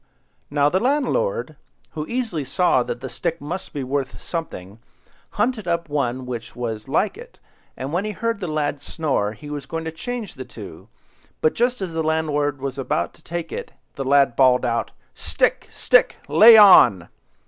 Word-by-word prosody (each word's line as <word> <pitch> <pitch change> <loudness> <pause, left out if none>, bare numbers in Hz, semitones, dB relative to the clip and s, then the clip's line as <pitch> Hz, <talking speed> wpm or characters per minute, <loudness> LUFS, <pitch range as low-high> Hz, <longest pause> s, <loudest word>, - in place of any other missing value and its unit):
Now 145 0 +2
the 185 +6 +1
landlord, 385 - 0 0.3
who 155 -1 -5
easily 230 - -2
saw 175 -1 +2
that 120 0 -5
the 130 - -5
stick 155 +7 -3
must 175 +6 -6
be 140 - -4
worth 135 0 -3
something, 110 - -6 0.6
hunted 215 -1 0
up 170 -2 -1
one 130 -3 -2
which 120 -2 -7
was 110 -3 -5
like 210 - 0
it, - - -13 0.4
and 135 +4 -5
when 180 +3 0
he 215 - -3
heard 230 +1 -2
the 180 - -4
lad 150 -2 -2
snore, 135 -10 -2
was 145 -2 -6
going 165 +3 -4
to 160 - -3
change 230 +6 -6
the - - -8
two, - - -11 0.5
but 465 - +2
just 245 -3 0
as 175 -3 -5
the 160 - -1
landlord 150 -3 0
was 135 0 -4
about 90 -9 -1
to - - -22
take 170 -1 -5
it, - - -6 0.2
the 135 - -4
lad 135 -2 +3
bawled 125 -1 +4
out— 115 -1 -1 0.2
"Stick, - - -1
stick! - - +3
lay 225 +1 +8
on!" 180 - +7
155 Hz, 175 wpm, -22 LUFS, 130-195 Hz, 0.6 s, lay